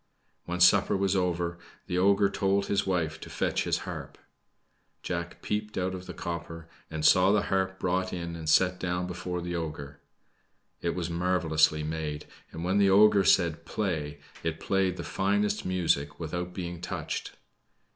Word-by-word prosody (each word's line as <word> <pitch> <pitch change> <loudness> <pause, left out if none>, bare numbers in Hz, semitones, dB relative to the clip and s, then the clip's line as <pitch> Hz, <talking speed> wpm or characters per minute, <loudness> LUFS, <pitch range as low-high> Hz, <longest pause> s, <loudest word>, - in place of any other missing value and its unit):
When 90 +1 -3
supper 95 +2 +5
was 100 0 +1
over, 85 -2 -1 0.3
the 90 - -1
ogre 100 +1 +4
told 100 0 +1
his 100 -1 0
wife 85 -5 -1
to - - -8
fetch - - -1
his - - +1
harp. - - -7 0.9
Jack 85 -1 -4
peeped 105 0 -3
out 95 0 -1
of 95 0 -7
the - - -6
copper 85 -1 -6 0.2
and 80 -1 -3
saw 95 +3 +6
the 105 -1 +3
harp 95 -1 0
brought 95 +1 0
in 85 -1 -4
and 80 -2 -4
set 90 +2 +4
down 90 0 -1
before 90 0 -4
the 85 0 -4
ogre. 75 -4 -5 0.8
It 85 - -1
was 85 -1 -3
marvelously 85 -3 +2
made; 75 -1 -4 0.3
and 80 - -6
when 95 +3 +2
the 100 -1 +5
ogre 100 0 +6
said 85 -3 +3
"Play!" 80 -7 -3 0.2
it 80 -1 -3
played 95 -2 0
the - - -5
finest 105 +1 0
music 80 -6 0
without 85 +2 -4
being 90 -2 -6
touched. 90 -3 -4
90 Hz, 165 wpm, -28 LUFS, 85-95 Hz, 0.9 s, saw